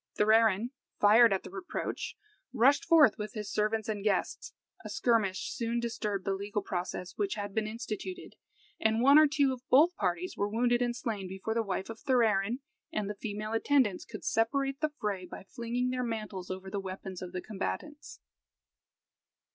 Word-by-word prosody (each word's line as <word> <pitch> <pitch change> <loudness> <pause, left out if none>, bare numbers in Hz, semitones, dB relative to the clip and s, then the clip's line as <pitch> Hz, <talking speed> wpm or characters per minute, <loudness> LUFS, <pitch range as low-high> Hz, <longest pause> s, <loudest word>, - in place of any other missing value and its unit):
Thorarin, 220 +1 +4 0.3
fired 220 +3 +7
at 195 - 0
the - - -9
reproach, 380 -2 -5 0.4
rushed 265 +3 +4
forth 300 -11 +6
with 210 0 -5
his 210 -2 -5
servants 215 0 0
and 210 -2 -3
guests; 205 -3 -1 0.3
a - - -7
skirmish 215 -6 +1
soon 235 0 -1
disturbed 210 -4 -3
the 195 - +1
legal 200 +1 -3
process 180 -1 -4
which 200 -1 0
had 205 -1 -5
been 215 0 0
instituted, 235 - -6 0.4
and 220 +2 +2
one 280 +3 +8
or 310 - +7
two 280 -2 +2
of 250 - -8
both 320 +7 +6
parties 180 -1 -2
were 200 +1 -1
wounded 240 +2 +2
and 240 -1 0
slain 220 -6 -3
before 190 +4 -4
the 230 - +1
wife 190 -3 -3
of 225 -1 -8
Thorarin 230 -2 +2 0.3
and 210 -2 -2
the 205 - -11
female 215 0 -4
attendants 225 -4 +2
could 215 -3 -9
separate 270 +4 +1
the 310 - +2
fray 205 -5 -2
by - - -9
flinging 235 +4 -2
their 255 0 -1
mantles 215 -6 -4
over 190 +1 -6
the 200 - -2
weapons 190 -1 -7
of 180 -1 -6
the 185 - -4
combatants. 180 - -5
220 Hz, 175 wpm, -30 LUFS, 195-240 Hz, 0.4 s, one